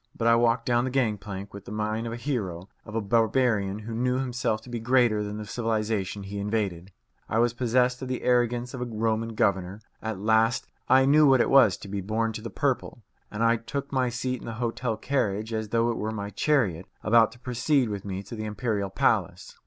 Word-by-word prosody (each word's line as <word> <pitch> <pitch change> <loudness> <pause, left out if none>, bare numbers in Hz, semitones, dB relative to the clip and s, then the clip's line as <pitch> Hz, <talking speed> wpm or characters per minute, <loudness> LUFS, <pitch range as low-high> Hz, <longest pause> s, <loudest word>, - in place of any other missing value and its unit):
But 115 - 0
I 115 - +6
walked 115 0 +2
down 120 -1 +2
the 130 - -1
gang 120 -6 0
plank 100 0 -7
with 100 -1 -10
the - - -9
mien 110 +2 -2
of - - -4
a - - -4
hero, 100 - -3 0.2
of 110 - -9
a 115 - +1
barbarian 110 -2 +1
who 110 +2 -7
knew 125 +2 0
himself 125 -4 -1
to 125 - -13
be 120 - -3
greater 120 -2 +3
than 105 0 -5
the 105 - -6
civilization 110 -3 -2
he 100 +1 -6
invaded. 100 -4 -2 0.4
I 110 - 0
was 120 0 +3
possessed 125 +1 +1
of 130 - -4
the 130 0 -3
arrogance 120 0 +1
of 130 - -6
a - - -1
Roman 115 0 -1
governor. 100 -3 0 0.2
At 110 -2 -3
last 110 +3 +2 0.2
I 130 0 +6
knew 150 +2 +6
what 135 -2 +5
it - - +2
was 130 -9 +6
to - - -10
be 100 0 -3
born 110 +3 -1
to 110 - -6
the 115 - -6
purple, 130 -3 -2 0.3
and 105 +2 -2
I 115 0 +4
took 140 +5 -5
my 130 -2 +1
seat 125 +1 -3
in - - -10
the 115 - -4
hotel 115 0 -2
carriage 110 -4 -1
as 110 -1 -3
though 115 +1 +2
it 115 - -4
were 110 - -2
my 100 -2 -5
chariot 100 - +1 0.2
about 115 0 +5
to 120 - -17
proceed 125 +1 +1
with 100 -2 -4
me 95 -1 -5
to 100 +4 -8
the 110 -1 -5
imperial 105 -2 -2
palace. 95 - 0
115 Hz, 225 wpm, -26 LUFS, 105-125 Hz, 0.4 s, I